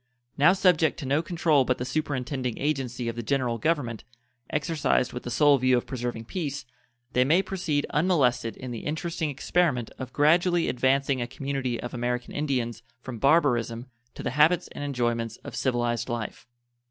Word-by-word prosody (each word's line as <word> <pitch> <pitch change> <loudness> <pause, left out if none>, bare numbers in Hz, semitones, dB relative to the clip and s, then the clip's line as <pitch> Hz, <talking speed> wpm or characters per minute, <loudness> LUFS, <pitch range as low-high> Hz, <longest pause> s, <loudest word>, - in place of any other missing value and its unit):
Now 155 +6 +5
subject 180 -5 +3
to 150 - -6
no 140 +4 +2
control 160 -4 +2
but 125 0 0
the 125 - -4
superintending 130 -4 -2
agency 130 -4 -2
of 115 - -2
the 120 - -3
General 125 -1 0
Government, 145 -9 -1 0.5
exercised 150 -3 0
with 125 - -5
the - - -6
sole 145 +3 +4
view 130 0 +3
of 120 - -2
preserving 120 -3 -4
peace, 145 -4 -4 0.5
they 125 - +4
may 165 +8 +3
proceed 175 -8 -1
unmolested 140 -9 +1
in 130 -1 -7
the 115 - -4
interesting 160 0 -2
experiment 140 -3 0
of 130 - -6
gradually 170 +3 +3
advancing 135 +1 +1
a 120 - -2
community 135 -2 -3
of 120 - -6
American 125 0 -2
Indians 125 -6 -2 0.2
from 125 -2 -7
barbarism 125 -5 +2 0.2
to - - -7
the - - -1
habits 150 +6 +3
and - - -7
enjoyments 120 -4 -1
of - - -8
civilized 120 -2 0
life. 120 -1 -5
135 Hz, 165 wpm, -26 LUFS, 120-150 Hz, 0.5 s, Now